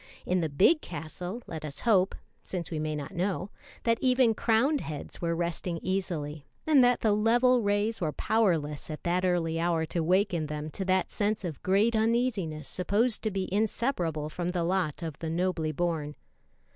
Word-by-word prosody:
In 180 Hz, 0 st, +1 dB
the 160 Hz, -, -1 dB
big 200 Hz, -, +4 dB
castle, 175 Hz, +7 st, -6 dB
let 160 Hz, -2 st, -7 dB
us 145 Hz, -2 st, -5 dB
hope, 195 Hz, -5 st, +3 dB, 0.3 s
since 180 Hz, -3 st, -5 dB
we 160 Hz, -, -2 dB
may 155 Hz, 0 st, -2 dB
not 145 Hz, +1 st, -5 dB
know, 185 Hz, +2 st, -2 dB, 0.3 s
that 230 Hz, 0 st, +2 dB
even 255 Hz, -3 st, +4 dB
crowned 240 Hz, +7 st, +2 dB
heads 150 Hz, -3 st, -7 dB
were 170 Hz, -1 st, 0 dB
resting 170 Hz, 0 st, -2 dB
easily, 160 Hz, -6 st, -3 dB, 0.2 s
and 295 Hz, -5 st, +6 dB
that 245 Hz, 0 st, +3 dB
the 220 Hz, -, +3 dB
level 240 Hz, +4 st, +4 dB
rays 205 Hz, +1 st, 0 dB
were 155 Hz, -3 st, 0 dB
powerless 165 Hz, -10 st, 0 dB
at 155 Hz, -, -6 dB
that 180 Hz, +1 st, +1 dB
early 170 Hz, -3 st, +1 dB
hour 165 Hz, -1 st, +1 dB
to 170 Hz, +1 st, -2 dB
waken 180 Hz, -1 st, +1 dB
them 150 Hz, +1 st, -5 dB
to 190 Hz, -, -3 dB
that 185 Hz, 0 st, +1 dB
sense 210 Hz, 0 st, -1 dB
of 160 Hz, -5 st, -5 dB
great 205 Hz, +5 st, +3 dB
uneasiness 220 Hz, -, 0 dB
supposed 210 Hz, +6 st, +1 dB
to 220 Hz, -, 0 dB
be 195 Hz, -2 st, -2 dB
inseparable 200 Hz, -, 0 dB
from 175 Hz, +3 st, -3 dB
the 180 Hz, -1 st, -1 dB
lot 175 Hz, -3 st, -1 dB
of 160 Hz, -3 st, -5 dB
the 165 Hz, -, -3 dB
"nobly 165 Hz, -2 st, 0 dB
born." 155 Hz, -2 st, -2 dB
180 Hz, 180 wpm, -29 LUFS, 160-215 Hz, 0.3 s, and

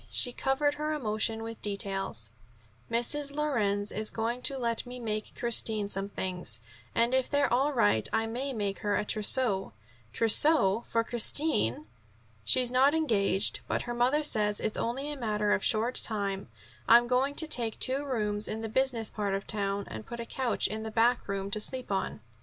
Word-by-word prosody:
She 245 Hz, -, +3 dB
covered 275 Hz, +3 st, 0 dB
her 305 Hz, +1 st, -3 dB
emotion 220 Hz, -4 st, -1 dB
with 225 Hz, 0 st, -8 dB
details: 195 Hz, -, -3 dB, 0.6 s
"Mrs. 280 Hz, +5 st, +1 dB
Lorenz 210 Hz, -9 st, 0 dB
is 215 Hz, 0 st, -1 dB
going 235 Hz, +2 st, -3 dB
to 270 Hz, +2 st, 0 dB
let 235 Hz, -2 st, 0 dB
me 250 Hz, 0 st, -9 dB
make 215 Hz, -2 st, -4 dB
Christine 220 Hz, -3 st, +2 dB
some 195 Hz, 0 st, -1 dB
things, 180 Hz, -, -1 dB, 0.4 s
and 235 Hz, +2 st, +2 dB
if 260 Hz, -1 st, +1 dB
they're 285 Hz, -4 st, +1 dB
all 270 Hz, +4 st, +2 dB
right 110 Hz, -, +2 dB
I 225 Hz, 0 st, +1 dB
may 250 Hz, +5 st, -3 dB
make 205 Hz, -5 st, -3 dB
her 205 Hz, -1 st, 0 dB
trousseau." 210 Hz, -, +1 dB, 0.4 s
"Trousseau 230 Hz, -, +3 dB
for 230 Hz, 0 st, +1 dB
Christine!" 235 Hz, -, +3 dB, 0.6 s
"She's 250 Hz, -, +3 dB
not 270 Hz, +4 st, +4 dB
engaged, 200 Hz, -, +1 dB
but -, -, -1 dB
her 240 Hz, -, -4 dB
mother 255 Hz, +6 st, +2 dB
says 210 Hz, -7 st, +2 dB
it's 215 Hz, -, -2 dB
only 270 Hz, +5 st, -2 dB
a -, -, -5 dB
matter 210 Hz, -3 st, 0 dB
of 205 Hz, -, 0 dB
a -, -, -2 dB
short 230 Hz, +3 st, +1 dB
time. 200 Hz, -3 st, -1 dB, 0.4 s
I'm 235 Hz, +1 st, +7 dB
going 255 Hz, +3 st, +1 dB
to 320 Hz, -, +2 dB
take 235 Hz, -7 st, -2 dB
two 265 Hz, +2 st, +1 dB
rooms 210 Hz, -6 st, -2 dB
in 220 Hz, +1 st, -4 dB
the 225 Hz, -, -4 dB
business 245 Hz, -2 st, 0 dB
part 200 Hz, -2 st, -2 dB
of 195 Hz, -, -5 dB
town, 200 Hz, -2 st, -2 dB
and 110 Hz, 0 st, -7 dB
put 235 Hz, -, -7 dB
a 235 Hz, -, -4 dB
couch 255 Hz, 0 st, -1 dB
in 220 Hz, 0 st, -2 dB
the 220 Hz, -, -5 dB
backroom 215 Hz, -4 st, 0 dB
to 215 Hz, -, 0 dB
sleep 255 Hz, +2 st, -3 dB
on." 190 Hz, -, -2 dB
225 Hz, 180 wpm, -29 LUFS, 205-255 Hz, 0.6 s, I'm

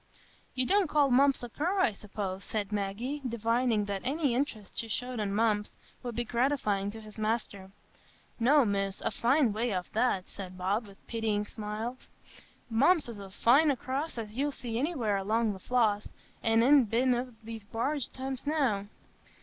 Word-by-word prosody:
"You 255 Hz, 0 st, +2 dB
don't 390 Hz, +1 st, +3 dB
call 290 Hz, -3 st, +3 dB
Mumps 275 Hz, +1 st, +4 dB
a 240 Hz, -, -5 dB
cur, 350 Hz, -, -1 dB
I 370 Hz, -, +4 dB
suppose?" 200 Hz, -2 st, -5 dB
said 210 Hz, -1 st, -3 dB
Maggie, 210 Hz, +8 st, -2 dB
divining 230 Hz, -1 st, +1 dB
that 200 Hz, -1 st, -3 dB
any 285 Hz, -1 st, 0 dB
interest 240 Hz, -6 st, -2 dB
she 230 Hz, -, -3 dB
showed 245 Hz, +2 st, -2 dB
in 205 Hz, -2 st, -1 dB
Mumps 210 Hz, -1 st, +1 dB, 0.3 s
would 245 Hz, -2 st, -5 dB
be 240 Hz, -, 0 dB
gratifying 235 Hz, -5 st, 0 dB
to 220 Hz, +2 st, -8 dB
his 215 Hz, 0 st, -11 dB
master. 215 Hz, -3 st, -2 dB, 0.7 s
"No, 270 Hz, +3 st, +5 dB
Miss, 195 Hz, -1 st, -1 dB
a -, -, -1 dB
fine 250 Hz, -1 st, +3 dB
way 230 Hz, +3 st, -1 dB
off 180 Hz, -1 st, -4 dB
that," 220 Hz, -5 st, +1 dB
said 185 Hz, -2 st, -8 dB
Bob, 200 Hz, +5 st, -1 dB
with 195 Hz, 0 st, -17 dB
pitying 220 Hz, -3 st, -1 dB
smile; 215 Hz, +4 st, -4 dB, 0.7 s
"Mumps 275 Hz, +6 st, +3 dB
is 225 Hz, -3 st, -7 dB
as 195 Hz, -1 st, -9 dB
fine 280 Hz, +7 st, +5 dB
a 280 Hz, -, +3 dB
cross 270 Hz, +4 st, -3 dB
as 215 Hz, -2 st, -6 dB
you'll 285 Hz, +3 st, 0 dB
see 235 Hz, -4 st, -4 dB
anywhere 250 Hz, -, 0 dB
along 215 Hz, +2 st, +1 dB
the 190 Hz, -, -9 dB
Floss, 215 Hz, -2 st, +1 dB, 0.3 s
an' 225 Hz, 0 st, +3 dB
I'n 275 Hz, 0 st, +6 dB
been 245 Hz, +4 st, +2 dB
up 245 Hz, +1 st, -1 dB
it 250 Hz, -, -16 dB
wi' 225 Hz, 0 st, -6 dB
the 205 Hz, -, -24 dB
barge 265 Hz, +4 st, -1 dB
times 265 Hz, +1 st, -5 dB
enow. 255 Hz, -10 st, +1 dB
230 Hz, 180 wpm, -30 LUFS, 210-260 Hz, 0.7 s, I'n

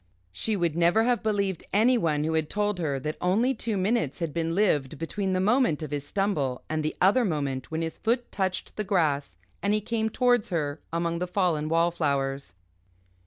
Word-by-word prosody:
She 210 Hz, -, -1 dB
would 170 Hz, -5 st, 0 dB
never 175 Hz, +6 st, +4 dB
have 245 Hz, 0 st, +1 dB
believed 200 Hz, -5 st, -1 dB
anyone 200 Hz, -9 st, +3 dB
who 160 Hz, +1 st, -1 dB
had 160 Hz, -1 st, 0 dB
told 210 Hz, -2 st, -1 dB
her 145 Hz, -5 st, -1 dB
that 155 Hz, +3 st, -3 dB
only 220 Hz, +9 st, +2 dB
two 225 Hz, -3 st, -3 dB
minutes 195 Hz, -, 0 dB
had 165 Hz, -4 st, -3 dB
been 165 Hz, 0 st, -1 dB
lived 155 Hz, -8 st, +1 dB
between 190 Hz, +4 st, -2 dB
the 185 Hz, -, +1 dB
moment 215 Hz, -, +2 dB
of 150 Hz, -, -6 dB
his 145 Hz, -1 st, -3 dB
stumble 150 Hz, -10 st, -1 dB
and 155 Hz, 0 st, -1 dB
the 155 Hz, 0 st, -2 dB
other 205 Hz, +7 st, +4 dB
moment 140 Hz, -, -2 dB
when 160 Hz, +1 st, -2 dB
his 160 Hz, -, -5 dB
foot 240 Hz, +2 st, 0 dB
touched 190 Hz, -2 st, -3 dB
the 215 Hz, -, -1 dB
grass 155 Hz, -, 0 dB, 0.2 s
and 205 Hz, +1 st, +2 dB
he -, -, +1 dB
came 220 Hz, +1 st, -1 dB
towards 245 Hz, -1 st, +2 dB
her 150 Hz, -4 st, -2 dB
among 170 Hz, 0 st, -1 dB
the 180 Hz, -, -2 dB
fallen 175 Hz, -5 st, 0 dB
wallflowers. 140 Hz, -, 0 dB
175 Hz, 190 wpm, -27 LUFS, 155-210 Hz, 0.2 s, never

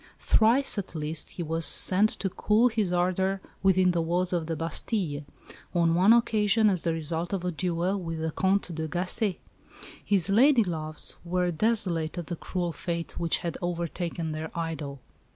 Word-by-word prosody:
Thrice, 230 Hz, +1 st, +4 dB
at 185 Hz, -, -7 dB
least, 155 Hz, 0 st, -2 dB
he 175 Hz, -, -6 dB
was 165 Hz, +1 st, -2 dB
sent 195 Hz, +6 st, +5 dB
to 195 Hz, -, -4 dB
cool 220 Hz, +6 st, +2 dB
his 215 Hz, -5 st, -1 dB
ardour 185 Hz, +2 st, 0 dB, 0.2 s
within 185 Hz, -1 st, +3 dB
the 170 Hz, -1 st, 0 dB
walls 175 Hz, +2 st, -1 dB
of 165 Hz, -3 st, -1 dB
the 165 Hz, -, -2 dB
Bastille 165 Hz, -1 st, -2 dB, 0.5 s
on 170 Hz, -1 st, +3 dB
one 185 Hz, +5 st, +4 dB
occasion 220 Hz, -2 st, +3 dB
as 180 Hz, -3 st, -1 dB
the 170 Hz, -, 0 dB
result 165 Hz, +2 st, -3 dB
of 185 Hz, -2 st, -3 dB
a 180 Hz, -, -1 dB
duel 175 Hz, +3 st, -1 dB
with 165 Hz, -2 st, -5 dB
the 160 Hz, 0 st, -2 dB
Comte 190 Hz, +1 st, 0 dB
de 160 Hz, 0 st, -4 dB
Gacé. 180 Hz, +4 st, -1 dB, 0.7 s
His 195 Hz, -4 st, +2 dB
lady 240 Hz, +5 st, +4 dB
loves 155 Hz, -4 st, -4 dB
were 180 Hz, 0 st, -1 dB
desolate 175 Hz, -4 st, 0 dB
at 175 Hz, -, -4 dB
the 175 Hz, -, -5 dB
cruel 175 Hz, +1 st, -4 dB
fate 170 Hz, 0 st, -5 dB
which 170 Hz, -1 st, +2 dB
had 170 Hz, -, -4 dB
overtaken 170 Hz, -1 st, -3 dB
their 155 Hz, +1 st, -5 dB
idol. 155 Hz, -5 st, -5 dB
175 Hz, 170 wpm, -27 LUFS, 165-195 Hz, 0.7 s, sent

